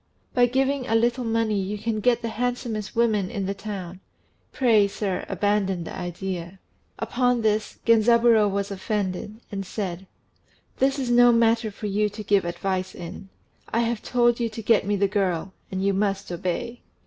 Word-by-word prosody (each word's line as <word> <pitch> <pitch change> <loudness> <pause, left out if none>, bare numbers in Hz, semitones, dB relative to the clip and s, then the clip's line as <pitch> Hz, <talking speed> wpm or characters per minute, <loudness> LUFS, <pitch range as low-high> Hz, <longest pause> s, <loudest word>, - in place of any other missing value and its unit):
By 245 -1 +4
giving 265 +1 0
a 225 - +1
little 240 +2 +2
money 225 -3 0
you 200 +2 -3
can 220 +1 -2
get 240 +2 +2
the 230 - -1
handsomest 235 -2 -3
woman 215 -5 +2
in 200 -5 -3
the 195 - -1
town. 195 -3 -7 0.5
Pray, 225 -6 +4
sir, 200 -2 -3
abandon 200 -3 0
the - - -7
idea." 175 0 -5 0.4
Upon 245 -2 +1
this 215 0 0
Genzaburô 230 -1 +5
was 200 0 -2
offended, 200 +1 -3
and 195 -1 -3
said 190 -2 -5 0.7
"This 270 +1 +2
is 255 -3 -1
no 245 0 +7
matter 230 -1 +3
for 210 +1 -8
you 210 +1 +1
to 210 +1 -8
give 200 -2 +2
advice 185 +1 -2
in. 175 +3 -8 0.4
I 230 - +2
have 230 -1 -1
told 240 -1 +2
you 235 -1 0
to 225 0 -7
get 215 -2 +3
me 205 - +2
the 200 0 +2
girl, 190 -2 -1 0.2
and 190 0 -2
you 200 - +3
must 195 -1 -1
obey." 180 +7 -3
210 Hz, 170 wpm, -25 LUFS, 195-235 Hz, 0.7 s, no